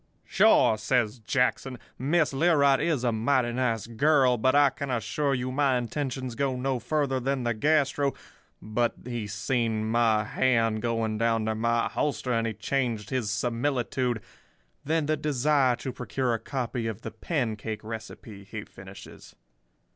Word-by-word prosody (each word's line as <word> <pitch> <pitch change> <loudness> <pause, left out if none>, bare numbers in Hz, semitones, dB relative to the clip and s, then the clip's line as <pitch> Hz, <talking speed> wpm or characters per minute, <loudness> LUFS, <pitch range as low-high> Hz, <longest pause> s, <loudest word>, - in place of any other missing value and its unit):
"'Sure,' 110 - +4
says 115 0 0
Jackson. 125 +1 0 0.2
'Miss 150 +3 +1
Learight 140 -2 +4
is 155 -7 0
a 120 - +2
mighty 120 +2 +1
nice 120 -3 0
girl, 130 +2 +3
but 130 +4 +2
I 145 -1 +5
can 140 +1 -6
assure 125 +4 0
you 125 0 -3
my 135 -1 +2
intentions 130 0 -3
go 135 +2 -1
no 130 0 -1
further 140 -2 0
than 135 0 -1
the 120 0 0
gastro—' 145 +2 +1 0.4
but 115 +2 -1
he 120 -4 -4
seen 110 +1 -1
my 110 -1 +2
hand 115 -1 +1
going 115 -2 -1
down 115 -1 +1
to 110 - 0
my 115 +1 +1
holster 135 -4 -1
and 115 0 +1
he 110 - -3
changed 110 -2 -2
his 125 -5 -1
similitude—'than 125 - -3
the 155 +1 +1
desire 140 -3 +2
to 130 - -5
procure 130 -3 -2
a 115 - -1
copy 120 -1 -3
of 110 -3 -5
the - - -5
pancake 110 -8 -3
recipe,' 110 -2 -8
he 95 - -7
finishes. - - -13
125 Hz, 150 wpm, -27 LUFS, 115-135 Hz, 0.4 s, I